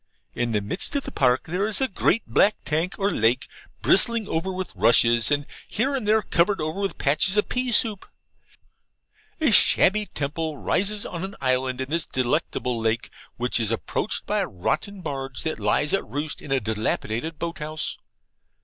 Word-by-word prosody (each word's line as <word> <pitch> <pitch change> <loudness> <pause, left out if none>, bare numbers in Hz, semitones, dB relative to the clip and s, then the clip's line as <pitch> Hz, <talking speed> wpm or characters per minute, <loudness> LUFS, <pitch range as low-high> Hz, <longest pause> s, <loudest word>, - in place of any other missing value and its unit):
In 120 0 -2
the 105 -2 0
midst 105 - +1
of 280 - 0
the - - -7
park 125 -1 +1
is 195 +6 0
a 265 - +1
great 220 +2 0
black 210 +1 +3
tank 165 +4 -1
or 200 +1 0
lake, 115 +4 +1 0.4
bristling 225 +2 +4
over 165 +4 -2
with 185 0 -5
rushes, 115 0 +4
and 145 -1 +1 0.2
here 265 +6 -1
and 255 -6 -2
there 215 0 +3
covered 185 +3 +1
over 155 +5 -3
with 195 -1 -2
patches 155 +8 +2
of 210 - +1
pea 250 0 -1
soup. 215 -3 +1 1.3
A 310 -6 +2
shabby 210 0 +5
temple 155 +2 -4
rises 205 +7 0
on 170 0 -5
an 195 +1 -6
island 130 -1 0
in 130 +2 -5
this 165 0 +2
delectable 125 -1 -1
lake, 115 +1 -1 0.3
which 125 0 0
is 110 -3 0
approached 115 - -2
by 210 - 0
a 195 - -1
rotten 155 - -3
barge 135 -5 -4
that 160 -5 -3
lies 105 +8 +1
at 195 - +1
roost 145 +2 -4
in 140 - -9
a 135 - +3
dilapidated 110 +6 -2
boat 170 +1 -5
house. 155 +1 -4
155 Hz, 175 wpm, -24 LUFS, 125-200 Hz, 1.3 s, shabby